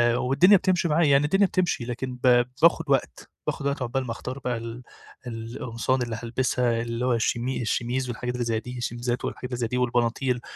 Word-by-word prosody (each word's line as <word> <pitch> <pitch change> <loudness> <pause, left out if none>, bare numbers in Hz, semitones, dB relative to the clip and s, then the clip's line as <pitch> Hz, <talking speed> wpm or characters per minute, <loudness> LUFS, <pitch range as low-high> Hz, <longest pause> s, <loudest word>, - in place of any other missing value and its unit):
والدنيا 170 +12 +5
بتمشي 180 -2 +1
معايا 160 +1 +3
يعني 140 +1 +5
الدنيا 195 +6 +3
بتمشي 180 -10 0
لكن 125 +1 -4
ب 120 -1 +5 0.2
باخد 165 -1 +5
وقت، 130 - 0 0.2
باخد 140 - -2
وقت 140 -1 -2
عقبال 130 +2 -1
ما 115 - -4
أختار 125 +3 -6
بقى 125 -2 -2
ال 115 +2 -7 0.4
القمصان 115 +2 -2
اللي 115 -2 -3
هالبسها 120 -1 0
اللي 115 +1 -3
هو 125 - +2
الشيمي 120 +3 0
الشيميز 120 +2 -1
والحاجات 125 +1 -3
اللي 120 -1 -2
زي 115 -1 0
دي 125 +2 -8
الشيميزات 120 0 -2
والحاجات 125 - -5
اللي 125 - -2
زي 115 - 0
دي 125 - -2
والبناطيل، 125 +1 0
125 Hz, 195 wpm, -25 LUFS, 120-130 Hz, 0.4 s, والدنيا